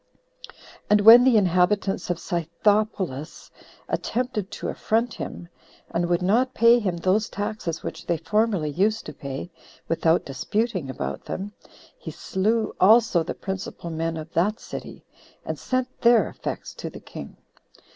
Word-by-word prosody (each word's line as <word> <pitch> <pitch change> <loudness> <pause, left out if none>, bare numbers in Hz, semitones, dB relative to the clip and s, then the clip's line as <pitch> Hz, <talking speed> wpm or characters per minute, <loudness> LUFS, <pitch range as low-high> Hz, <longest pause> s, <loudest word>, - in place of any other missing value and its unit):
And 210 0 +5
when 230 +4 +10
the 250 -3 +5
inhabitants 190 +1 +1
of 175 - 0
Scythopolis 175 -2 -1 0.4
attempted 240 -5 -2
to - - -5
affront 230 +2 0
him, 170 - -7 0.4
and 175 +1 -1
would 175 0 +1
not 245 +7 +2
pay 235 +1 +6
him 185 -6 -2
those 190 +5 +1
taxes 205 -5 -4
which - - -7
they 170 - +1
formerly 210 -6 0
used 210 +8 0
to - - -7
pay, 140 +5 -6 0.4
without 165 0 +2
disputing 185 - -2
about 130 - -5
them, 200 +2 -5 0.5
he - - -7
slew 215 +3 -1
also 215 -2 +5
the 160 - -4
principal 190 -3 -6
men 165 0 -2
of 160 +1 -8
that 205 +6 +1
city, - - -9 0.4
and - - -4
sent 255 -1 -1
their 235 -1 +5
effects - - -6
to - - -6
the - - -10
king. - - -10
195 Hz, 145 wpm, -24 LUFS, 170-220 Hz, 0.5 s, when